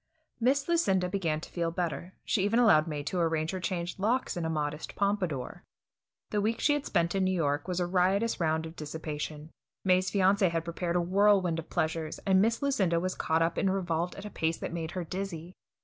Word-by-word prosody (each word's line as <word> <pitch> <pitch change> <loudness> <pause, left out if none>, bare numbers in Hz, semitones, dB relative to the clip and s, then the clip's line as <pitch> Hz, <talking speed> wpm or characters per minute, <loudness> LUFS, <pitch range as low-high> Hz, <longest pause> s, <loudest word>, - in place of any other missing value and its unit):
Miss 270 +4 +2
Lucinda 195 - +2
began 170 -5 -1
to - - -10
feel 170 -1 -1
better; 175 +1 -3
she 195 - +1
even 205 +3 +2
allowed 195 -11 +5
May 150 -2 -3
to 180 +5 -2
arrange 160 -1 +1
her 190 - -3
changed 180 -1 -3
locks 235 +6 0
in 175 -2 -2
a - - -1
modest 150 -1 -3
pompadour. 185 -10 -1 0.7
The 210 - +1
week 220 +2 0
she 295 - +3
had 290 -1 -2
spent 170 0 +1
in 195 -1 +1
New 185 - +2
York 145 -2 0
was 180 -1 -1
a 175 - +1
riotous 190 +5 +1
round 160 -1 +1
of 160 +1 -9
dissipation. 150 0 -6 0.3
May's 185 0 +3
fiancé 195 -1 +3
had 165 -1 -2
prepared 170 +1 -2
a 175 - +3
whirlwind 185 -2 +3
of 165 - -8
pleasures, 160 0 -1
and 190 -1 +4
Miss 230 +6 +1
Lucinda 195 -12 +2
was 185 +1 -1
caught 160 +1 +1
up 165 0 0
and 195 - +2
revolved 175 -2 -1
at 200 - -8
a 210 - -6
pace 160 0 -1
that - - -5
made 165 -2 -3
her 180 - -1
dizzy. 180 -1 -5
180 Hz, 210 wpm, -29 LUFS, 160-195 Hz, 0.7 s, allowed